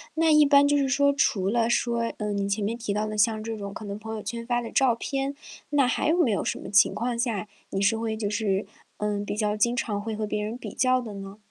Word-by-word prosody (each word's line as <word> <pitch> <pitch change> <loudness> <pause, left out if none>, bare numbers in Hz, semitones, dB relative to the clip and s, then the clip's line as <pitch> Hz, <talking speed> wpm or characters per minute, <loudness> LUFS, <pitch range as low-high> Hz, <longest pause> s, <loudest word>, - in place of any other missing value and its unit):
那 320 0 +3
一 300 0 +7
般 280 0 +6
就 290 - +3
是 275 -2 +2
说 280 +2 +3
除 195 -8 +1
了 230 +1 +1
说， 235 -1 0
嗯， 210 -1 -2
你 200 0 -1
前 205 +1 -1
面 225 +3 -1
提 230 -3 -4
到 210 +1 0
的 215 - -4
像 215 +1 +2
这 225 0 -4
种 200 -1 -6
可 215 - -8
能 200 +1 -5
朋 220 0 -6
友 215 - -6
圈 230 +3 -5
发 240 0 +1
的 230 - -7
照 260 -4 +3
片， 275 +3 -3 0.3
那 285 -3 +3
还 295 - 0
有 340 - +3
没 285 -11 +3
有 200 - 0
什 - - -2
么 - - -8
情 200 -1 +5
况 235 +2 -2
下 220 -5 -1 0.2
你 195 - -2
是 205 +3 +3
会 225 -1 -2
就 210 -2 -2
是， 205 -2 0 0.3
嗯， 205 -1 -1
比 205 - -4
较 210 -1 0
经 235 +3 +2
常 210 -4 -2
会 220 0 -4
和 215 0 -2
别 210 0 -2
人 220 +3 -4
比 - - -8
较 255 0 +3
的 225 -4 -7
呢？ 195 +1 -8
220 Hz, 290 characters per minute, -26 LUFS, 210-250 Hz, 0.3 s, 一